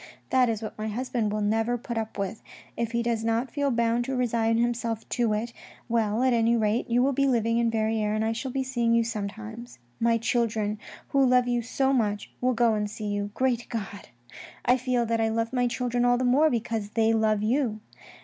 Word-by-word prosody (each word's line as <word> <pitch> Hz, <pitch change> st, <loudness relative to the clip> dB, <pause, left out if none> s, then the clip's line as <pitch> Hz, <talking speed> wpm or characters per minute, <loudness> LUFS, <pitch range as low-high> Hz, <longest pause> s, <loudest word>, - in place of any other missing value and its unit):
" -, -, -35 dB
That 255 Hz, -2 st, +4 dB
is 225 Hz, -1 st, -2 dB
what 215 Hz, -, -6 dB
my 215 Hz, -, -2 dB
husband 230 Hz, -1 st, -2 dB
will 210 Hz, 0 st, -1 dB
never 225 Hz, +3 st, +1 dB
put 235 Hz, 0 st, -6 dB
up 220 Hz, -2 st, -4 dB
with. 200 Hz, +2 st, -3 dB, 0.3 s
If 235 Hz, -1 st, -2 dB
he 235 Hz, 0 st, 0 dB
does 230 Hz, -2 st, -1 dB, 0.3 s
feel 285 Hz, -1 st, 0 dB
bound 235 Hz, -1 st, +1 dB
to 265 Hz, 0 st, -2 dB
resign 230 Hz, -2 st, +1 dB
himself 235 Hz, -1 st, -1 dB
to 235 Hz, -3 st, +1 dB
it, 230 Hz, +3 st, -3 dB, 0.3 s
well, 230 Hz, 0 st, +1 dB
at 260 Hz, -1 st, +3 dB
any 230 Hz, 0 st, +3 dB
rate, 220 Hz, +2 st, 0 dB
you 240 Hz, +1 st, +3 dB
will 275 Hz, +1 st, +2 dB
be 275 Hz, +1 st, +2 dB
living 230 Hz, -2 st, +2 dB
in 235 Hz, -1 st, +2 dB
Verrieres 220 Hz, -1 st, 0 dB
and 215 Hz, 0 st, 0 dB
I 225 Hz, -, +1 dB
shall 235 Hz, +4 st, -4 dB
be 265 Hz, +1 st, -1 dB
seeing 240 Hz, -3 st, +1 dB
you 230 Hz, -, +4 dB
sometimes. 220 Hz, -, -6 dB, 0.2 s
My 230 Hz, 0 st, +3 dB
children, 220 Hz, -2 st, 0 dB, 0.3 s
who 275 Hz, -1 st, +3 dB
love 250 Hz, -1 st, +4 dB
you 240 Hz, -1 st, +1 dB
so 265 Hz, +3 st, 0 dB
much, 210 Hz, -5 st, -1 dB
will 250 Hz, 0 st, +2 dB
go 230 Hz, -1 st, +3 dB
and 210 Hz, -1 st, -1 dB
see 210 Hz, 0 st, -5 dB
you. 205 Hz, 0 st, -2 dB
Great 250 Hz, -2 st, 0 dB
God! 205 Hz, -3 st, -5 dB, 0.6 s
I 250 Hz, -, +5 dB
feel 250 Hz, -1 st, 0 dB
that 230 Hz, 0 st, 0 dB
I 225 Hz, -, +2 dB
love 230 Hz, +2 st, -1 dB
my 245 Hz, -1 st, +2 dB
children 245 Hz, 0 st, -1 dB
all 245 Hz, 0 st, +4 dB
the 255 Hz, -, 0 dB
more 285 Hz, +6 st, +4 dB
because 225 Hz, -4 st, -2 dB
they 225 Hz, 0 st, +3 dB
love 215 Hz, -2 st, +2 dB
you. 230 Hz, -1 st, 0 dB
230 Hz, 215 wpm, -26 LUFS, 220-245 Hz, 0.6 s, I